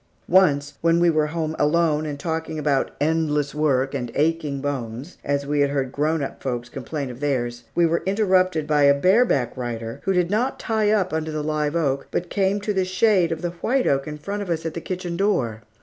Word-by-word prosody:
Once, 145 -6 +3
when 165 0 +3
we 170 0 +4
were 155 -1 +2
at 150 - -8
home 160 -2 -2
alone 155 0 +2
and 145 -1 -5
talking 160 0 -3
about 145 -3 +1
"endless 150 -1 0
work 135 -3 +1
and 125 -3 -3
aching 150 -2 0
bones," 135 +1 -5
as 140 0 -1
we 145 +1 0
had 140 0 +3
heard 135 -2 -1
grown 155 +2 0
up - - -6
folks 120 -2 -3
complain 135 +1 -5
of 120 - -10
theirs, 120 -4 -2
we 175 - +4
were 165 +1 +1
interrupted 185 -5 +2
by 150 -1 +2
a 140 0 +6
bareback 185 - +3
rider 115 -2 -5
who 195 - +2
did 180 -1 +1
not 240 +6 0
"tie 220 -2 +1
up" 195 -5 +1
under 160 0 -1
the 155 -1 -3
live 150 0 -1
oak, 140 -4 0
but 175 0 -3
came 195 0 +1
to 205 +1 -2
the 190 -1 +1
shade 185 -2 +2
of 165 +1 -4
the 175 - -1
white 245 +10 0
oak 135 +1 +1
in 150 0 -5
front 200 +7 -4
of 200 - -5
us 165 -1 -2
at 165 - -3
the 170 - -5
kitchen 180 -1 -4
door. 125 - 0
155 Hz, 220 wpm, -23 LUFS, 140-180 Hz, -, a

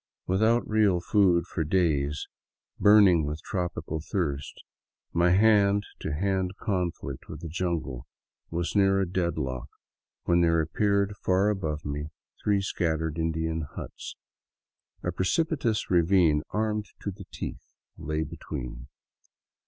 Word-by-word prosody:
Without 110 +6 +2
real 105 -4 +3
food 90 -2 +3
for 85 - -2
days, 75 -4 +1 0.5
burning 100 -6 +6
with 75 +1 -3
tropical 90 -4 -3
thirst, 75 -5 -3 0.5
my 85 +1 +3
hand 100 +1 +4 0.2
to 80 - -4
hand 95 +3 -1
conflict 90 - -3
with - - -7
the 85 - -5
jungle 80 -7 -3 0.4
was 85 +3 -2
near 95 -1 +4
a 95 - +1
dead 85 -2 -1
lock 65 -4 -3 0.5
when 85 0 +3
there 85 -1 +3
appeared 100 +5 +1
far 95 +3 +2
above 80 -7 -2
me 75 +1 -3 0.4
three 100 -1 +2
scattered 80 -4 -1
Indian 80 0 -1
huts. - - -7 0.9
A 90 - 0
precipitous 115 - 0
ravine, 85 -3 +4
armed 105 -1 -1
to 100 - -3
the 95 - -11
teeth, - - -7 0.2
lay 80 0 -2
between. 65 -6 -7
85 Hz, 125 wpm, -27 LUFS, 80-100 Hz, 0.9 s, burning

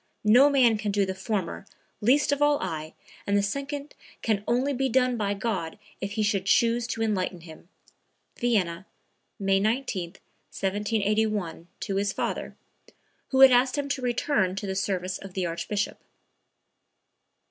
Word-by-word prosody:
No 250 +7 +7
man 245 -6 +4
could 205 -1 -2
do 200 -1 +2
the 190 - -3
former, 190 -1 -3 0.3
least 270 +7 +3
of 285 0 0
all 290 0 +4
I, 155 0 -5 0.3
and 200 0 +3
the 200 - +2
second 280 +6 -4 0.3
can 210 -3 0
only 255 +4 +1
be 265 +1 0
done 255 0 +2
by 205 -3 -1
God 195 -4 -3 0.2
if 200 +1 -4
He 215 0 0
should 195 -2 0
choose 235 +2 +3
to 225 -1 -2
enlighten 185 -5 -1
him." 160 +1 -13 0.7
(Vienna, 190 -7 0 0.5
May 195 -1 +2
19, 210 -5 -1 0.4
1781, 205 -3 -1
to 195 - -2
his 200 0 0
father, - - -3 0.7
who 265 0 +2
had 270 -1 +10
asked 250 +2 +3
him 285 -1 -1
to 280 - -2
return 240 -5 0
to 195 - -4
the 190 - -2
service 190 -1 -2
of 195 -2 -11
the 185 -2 -1
Archbishop.) 200 +5 -3
210 Hz, 155 wpm, -26 LUFS, 190-245 Hz, 0.7 s, had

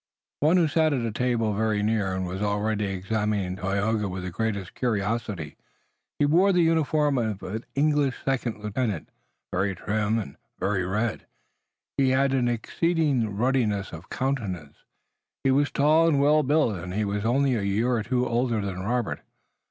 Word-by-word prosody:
One 160 +5 +4
who 170 -3 +4
sat 155 0 +2
at 125 -4 -1
a 115 - -2
table 115 -2 0
very 105 0 0
near 105 -4 0
was 90 +1 -4
already 105 +1 0
examining 100 0 -1
Tayoga 100 +2 -1
with 95 0 -5
the 90 - -4
greatest 100 -2 -3
curiosity. 105 - -2 0.6
He 145 - +3
wore 175 +7 +4
the 180 -2 +3
uniform 155 -3 +2
of 110 -4 -2
an 110 +5 -5
English 145 -2 +2
second 120 -5 -1
lieutenant, 105 -4 -2 0.4
very 95 +1 0
trim, 105 +4 0
and 100 -11 -5 0.2
very 95 0 0
red, 110 +4 -2 0.7
he 135 -1 +3
had 135 +1 +2
an 125 -2 +2
exceeding 125 - 0
ruddiness 115 -5 +1
of 85 +2 -10
countenance, 100 - -3 0.7
he 135 - +3
was 145 +2 +3
tall 155 +3 +4
and 150 -4 +3
well 150 +2 +4
built, 145 -7 +2
and 90 +2 -6
he 105 0 0
was 100 0 -2
only 130 +4 +2
a 115 - 0
year 100 +5 0
or 120 -2 +1
two 125 +3 0
older 120 -1 0
than 100 -3 -3
Robert. 120 +3 -1
110 Hz, 165 wpm, -26 LUFS, 100-135 Hz, 0.7 s, One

